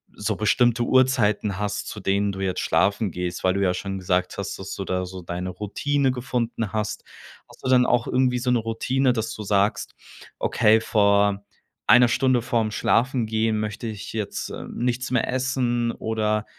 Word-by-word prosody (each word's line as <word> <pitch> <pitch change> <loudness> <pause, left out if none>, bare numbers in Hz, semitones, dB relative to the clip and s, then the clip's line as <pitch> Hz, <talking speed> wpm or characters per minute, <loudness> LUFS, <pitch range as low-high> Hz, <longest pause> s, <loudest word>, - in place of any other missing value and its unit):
so 105 +1 -2
bestimmte 120 +3 +2
Uhrzeiten 115 -6 +2
hast, 105 -1 -3
zu 105 - -6
denen 100 +1 0
du 95 - -8
jetzt 95 -2 -1
schlafen 100 0 +1
gehst, 90 +1 -4
weil 95 - +3
du 100 - 0
ja 90 -2 +2
schon 95 +1 -4
gesagt 90 0 -1
hast, 100 - -4
dass 95 0 -7
du 95 - -5
da 90 0 -1
so 95 0 -8
deine 90 +1 -5
Routine 135 +8 -1
gefunden 120 -4 -3
hast, 105 -2 -3 0.5
hast - - -18
du - - 0
denn 125 -1 +5
auch 120 -1 +1
irgendwie 125 -1 +1
so 125 +1 -1
'ne 125 - +3
Routine, 125 +4 0
dass 115 -2 -3
du 105 - -7
sagst: 100 0 0 0.5
„Okay, 110 -1 +3
vor 100 -2 +2 0.5
eine 125 -1 +7
Stunde 130 0 +2
vorm 115 -2 0
Schlafengehen 110 -1 +1
möchte 105 +2 -4
ich 105 -3 -7
jetzt, 110 -2 -4
äh, - - -7
nichts 125 +1 -2
mehr 125 -3 +1
essen“ 125 -2 0
oder, 110 -1 -1
110 Hz, 175 wpm, -24 LUFS, 100-125 Hz, 0.5 s, eine